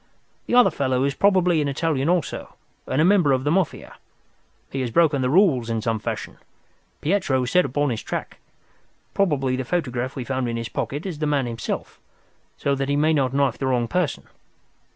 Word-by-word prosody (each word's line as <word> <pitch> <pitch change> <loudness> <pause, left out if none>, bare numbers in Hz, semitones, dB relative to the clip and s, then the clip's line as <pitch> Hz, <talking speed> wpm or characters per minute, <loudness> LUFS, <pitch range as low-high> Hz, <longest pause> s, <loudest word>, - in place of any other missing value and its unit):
The - - +1
other 245 - +6
fellow 130 -2 0
is 140 0 +1
probably 180 -3 +3
an 145 - 0
Italian 145 0 0
also, 180 -1 -2 0.3
and 135 - -1
a 155 - +5
member 180 -7 +4
of 130 0 0
the 145 - +1
Mafia. 185 -1 -1 0.7
He 135 - -2
has 125 - -2
broken 150 +1 +3
the 125 - +1
rules 145 - +3
in 115 -1 -1
some 115 -1 -1
fashion. 105 - -5 0.6
Pietro 150 -7 +1
is 125 - -3
set 180 - +4
upon 145 +1 0
his 115 - -3
track. - - -5 0.7
Probably 140 -9 +1
the 130 - -2
photograph 130 -4 -2
we 130 - -4
found 130 -1 -2
in 115 - -2
his 115 -1 -4
pocket 145 - -4
is 175 -6 -5
the 155 - 0
man 145 -3 +1
himself, 115 -1 -5 0.6
so 140 - 0
that 135 0 -2
he 140 - +2
may 155 +2 +3
not 135 -4 +1
knife 140 0 +1
the 135 - -1
wrong 125 -2 +1
person. 180 +3 -1
140 Hz, 195 wpm, -23 LUFS, 130-165 Hz, 0.7 s, other